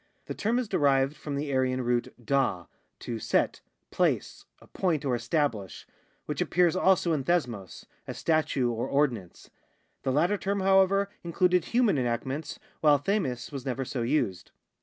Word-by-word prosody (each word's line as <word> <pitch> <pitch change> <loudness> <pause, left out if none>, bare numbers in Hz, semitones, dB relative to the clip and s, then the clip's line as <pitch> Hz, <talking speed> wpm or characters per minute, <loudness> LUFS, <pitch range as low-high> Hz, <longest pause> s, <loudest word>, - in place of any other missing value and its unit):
The - - -5
term 225 +4 0
is 250 -2 -1
derived 140 -4 +2
from 145 -2 -5
the 140 0 -3
Aryan 130 -1 +1
root 120 0 0
DHA, 120 -10 +1 0.4
to 115 -2 -4
set, - - 0 0.3
place, - - 0
appoint, 160 -6 -2
or 130 - +1
establish, 120 - -2 0.4
which - - -3
appears 175 0 +2
also 185 -2 +3
in 145 -4 -1
deanoQ, 125 - -2 0.2
a - - -5
statute 145 -6 +1
or 115 - -2
ordinance.* 125 -11 -1 0.5
This 130 - -1
latter 180 +7 +2
term, 200 0 -1
how 195 0 +5
ever, 195 +1 +1
included 180 0 +2
human 235 - +2
enactments, 130 +5 -3 0.2
while 150 -2 +5
Ofuii; 140 - -2
was 135 -3 -6
never 135 0 -3
so 125 -1 -4
used. 115 -8 -1
145 Hz, 155 wpm, -28 LUFS, 125-175 Hz, 0.5 s, how